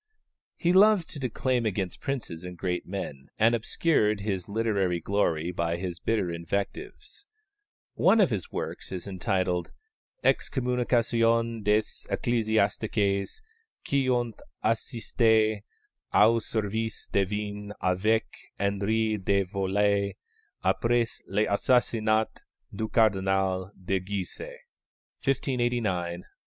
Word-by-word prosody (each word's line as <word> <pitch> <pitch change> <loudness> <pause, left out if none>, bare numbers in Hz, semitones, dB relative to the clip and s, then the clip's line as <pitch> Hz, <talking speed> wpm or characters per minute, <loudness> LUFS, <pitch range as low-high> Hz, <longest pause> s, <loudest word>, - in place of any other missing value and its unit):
He 175 +1 +2
loved 200 -2 +5
to 145 - -5
declaim 125 -1 0
against 95 -3 -3
princes 120 -12 -4
and 90 -1 -7
great 90 -1 -2
men, 75 -8 -5
and 115 +2 +4
obscured 110 -3 +1
his 100 -2 -3
literary 100 -5 0
glory 85 -3 0
by 85 -1 -1
his 90 -1 -4
bitter 100 -3 0
invectives. 100 - -5 0.7
One 225 - +4
of 190 -9 +4
his 100 -5 -3
works - - -5
is 95 +1 -5
entitled 95 -2 -1 0.5
_Excommunication 115 -3 +1
des 105 +1 +4
Ecclésiastiques 105 - 0 0.5
qui 135 -2 +1
ont 120 -2 +1 0.3
assisté 110 -2 +2 0.5
au 115 +2 +5
service 110 0 -3
divin 105 +1 -1
avec 100 +5 +2 0.3
Henri 105 +2 +1
de 100 0 +1
Valois 100 +1 +1 0.5
après 120 -1 +2 0.2
l'assassinat 110 +1 +2 0.4
du 110 +2 -2
Cardinal 95 -3 +2
de 95 +1 -1
Guise_ 95 +1 -5 0.8
(1589, 120 -9 0
in 85 - -7
8). - - -21
105 Hz, 105 wpm, -27 LUFS, 95-115 Hz, 0.8 s, loved